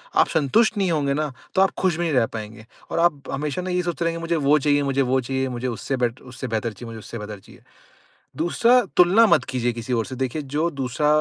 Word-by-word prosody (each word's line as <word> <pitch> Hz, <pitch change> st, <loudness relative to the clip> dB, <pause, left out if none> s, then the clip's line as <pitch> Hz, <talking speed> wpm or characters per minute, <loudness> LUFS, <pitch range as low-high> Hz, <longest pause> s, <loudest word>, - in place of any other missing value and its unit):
आप -, -, +5 dB
संतुष्ट 210 Hz, -, +2 dB
नहीं 190 Hz, -3 st, +1 dB
होंगे 145 Hz, -3 st, +1 dB
ना, 150 Hz, 0 st, -1 dB, 0.2 s
तो 190 Hz, -, +4 dB
आप 195 Hz, -, +5 dB
खुश 185 Hz, -3 st, +2 dB
भी 175 Hz, -, -1 dB
नहीं 165 Hz, -3 st, 0 dB
रह 125 Hz, -4 st, +4 dB
पाएँगे 110 Hz, 0 st, -7 dB, 0.3 s
और -, -, -1 dB
आप 170 Hz, -4 st, +2 dB
हमेशा 145 Hz, +4 st, -2 dB
ना 185 Hz, -, -5 dB
ये 180 Hz, 0 st, +1 dB
सोचते 175 Hz, -1 st, -2 dB
रहेंगे, 165 Hz, 0 st, -1 dB
मुझे 165 Hz, 0 st, -1 dB
वो 150 Hz, -1 st, +3 dB
चाहिए 145 Hz, 0 st, +2 dB
मुझे 140 Hz, 0 st, +1 dB
वो 130 Hz, 0 st, +2 dB
चाहिए, 130 Hz, +2 st, -2 dB
मुझे 125 Hz, 0 st, -4 dB
उससे 130 Hz, +3 st, -3 dB
बेटर 120 Hz, 0 st, -2 dB
उससे 130 Hz, +1 st, -7 dB
बेहतर 115 Hz, -1 st, -2 dB
चीज़ 115 Hz, +4 st, -10 dB
है, -, -, -8 dB
मुझे 115 Hz, -1 st, -8 dB
उससे 115 Hz, -, -8 dB
बेहतर 105 Hz, -1 st, -7 dB
चीज़ -, -, -17 dB
है। -, -, -31 dB, 0.7 s
दूसरा 230 Hz, +10 st, +4 dB, 0.2 s
तुलना 185 Hz, +6 st, +6 dB
मत -, -, +4 dB
कीजिए 125 Hz, -2 st, 0 dB
किसी 115 Hz, +2 st, -4 dB
और 115 Hz, -2 st, +1 dB
से। 130 Hz, -, -7 dB
देखिए 130 Hz, +4 st, -2 dB
जो 160 Hz, +3 st, +1 dB
दूसरा 135 Hz, 0 st, -1 dB
140 Hz, 250 wpm, -23 LUFS, 125-170 Hz, 0.7 s, तुलना